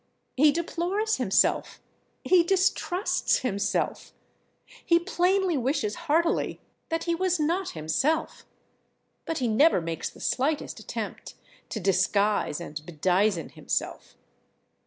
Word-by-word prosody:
He 295 +3 +5
deplores 355 +7 -1
himself, - - +1 0.4
he 365 -1 +5
distrusts 380 +2 +1
himself, 200 -5 -2 0.7
he 335 - +4
plainly 365 0 +1
wishes 250 -4 -1 0.2
heartily 335 +3 +1 0.3
that 330 0 -1
he 340 - 0
was 365 0 0
not 340 +5 -1
himself, 265 - -1 0.8
but 325 - -2
he 250 - 0
never 230 - +4
makes 165 -1 -4
the - - -17
slightest 285 +3 -1
attempt - - -6 0.3
to 220 - -4
disguise 195 -2 +1
and 155 -3 -7
bedizen 180 +3 0
himself. - - -4
305 Hz, 110 wpm, -26 LUFS, -, 0.8 s, He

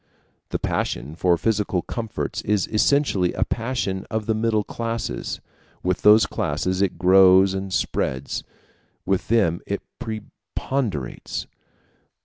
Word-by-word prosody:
The - - -1
passion 70 +5 -2
for 90 0 +3
physical 105 -3 0
comforts 115 -2 -4
is 105 -2 +1
essentially 110 -5 +2
a - - +1
passion 115 -5 -2
of 110 -1 -2
the 110 - +1
middle 110 -1 +1
classes: 115 +1 -4 0.4
with 90 0 0
those 105 +1 +7
classes 90 +6 -1
it 95 -4 +1
grows 95 +1 +6
and 95 0 -4
spreads, 65 -6 -1 0.6
with 95 -1 0
them 100 -8 +2
it - - -3 0.2
preponderates. 110 - -4
100 Hz, 120 wpm, -23 LUFS, 90-110 Hz, 0.6 s, those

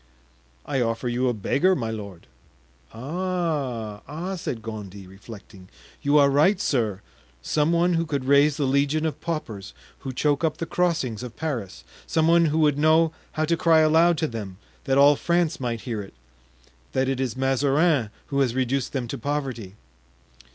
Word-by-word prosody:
"I 135 -3 -1
offer 115 +1 -1
you 125 +1 0
a - - 0
beggar, 175 - +2
my 115 -6 -3
lord." 100 -5 -8 0.7
"Ah! 140 - -3
ah!" 170 +7 -5
said 125 -10 -5
Gondy, 100 -3 -8
reflecting, 95 -1 -13 0.3
"you 145 0 +3
are 140 -1 +5
right, 165 +8 +3
sir; 110 -7 -1 0.4
some 150 - +1
one 170 +1 +2
who 165 0 0
could 140 -4 -2
raise 140 +2 +4
the 145 - 0
legion 140 +4 +1
of 155 - -3
paupers 115 - -5 0.2
who 135 - -6
choke 145 +4 0
up 160 -2 0
the 165 - -3
crossings 160 -11 -1
of 125 -2 -8
Paris; 135 - -4 0.2
some 160 0 +1
one 170 0 +5
who 155 0 0
would 150 -2 +2
know 160 +1 +4 0.2
how 155 0 0
to 170 +2 +1
cry 165 -1 +4
aloud 160 +2 +4
to 160 - 0
them, 105 -7 -7 0.3
that 135 0 +1
all 145 +1 +7
France 170 +1 0
might 120 -3 -3
hear 115 -5 -4
it, 95 -8 -12 0.8
that 130 0 +1
it 135 -1 -1
is 130 -2 -2
Mazarin 135 0 +2 0.2
who 140 - -1
has 130 -3 +1
reduced 130 0 -1
them 130 -4 -2
to - - -5
poverty." 130 -8 -4
140 Hz, 170 wpm, -24 LUFS, 115-160 Hz, 0.8 s, all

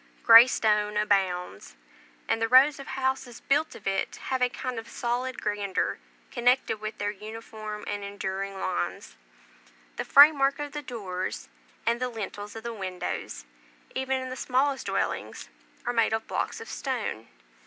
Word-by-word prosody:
Grey 230 +1 +10
stone 210 -3 +1
abounds; 185 - 0 0.5
and 225 - 0
the 225 - +2
rows 265 +4 +6
of 275 - -9
houses 265 -2 -2
built 295 +3 0
of 205 - -13
it 195 0 -1
have 260 -1 -3
a 250 - +4
kind 250 -1 -4
of 225 - -10
solid 250 +2 -2
grandeur 205 -2 -1 0.3
connected 245 -3 +2
with 215 0 -5
their 205 0 -1
uniform 215 0 -8
and 205 0 -4
enduring 195 -1 -4
lines. 185 -1 -3 0.8
The - - -1
frame 290 +1 +8
work 275 0 +3
of 290 -1 -5
the 295 +1 -5
doors, 195 -8 -5 0.4
and 235 +1 +1
the 255 - 0
lintels 210 -2 -6
of 225 - -7
the 235 0 -4
windows, 185 - -5 0.5
even 265 0 -1
in 260 0 -5
the - - -4
smallest 265 +2 0
dwellings, - - -2 0.4
are 245 - 0
made 230 -2 +2
of 220 0 -1
blocks - - -3
of 455 - -9
stone. 230 - -4
225 Hz, 160 wpm, -27 LUFS, 205-260 Hz, 0.8 s, Grey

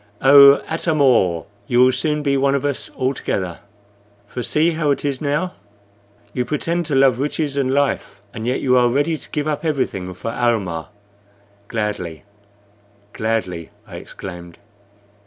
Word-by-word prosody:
Oh, 140 +1 +8
Atam 160 -1 -1
or! 95 - +3 0.2
you 125 -2 +4
will 130 - +5
soon 150 +2 -1
be 140 -1 +1
one 140 0 +2
of 140 - -1
us 145 -2 -2
altogether. 100 -9 -2 0.7
For 125 +4 -6
see, 155 +7 +2
how 155 -2 -1
is 140 - 0
it 140 -2 -2
now? 150 +5 -1 0.8
You 125 - 0
pretend 165 +5 -2
to 145 - -1
love 135 -2 +4
riches 145 0 -2
and 135 -2 0
life, 140 -7 -1
and 110 0 -5
yet 125 - 0
you 130 -1 +3
are 120 0 +3
ready 145 +6 +1
to - - -10
give 150 0 -2
up 150 0 -2
everything 125 - -2
for 115 - -5
Almah." 100 -10 -1 0.8
"Gladly, 105 -8 -4 0.9
gladly!" 100 -7 -2 0.2
I - - -9
exclaimed. 90 -3 -9
135 Hz, 155 wpm, -20 LUFS, 110-145 Hz, 0.9 s, Oh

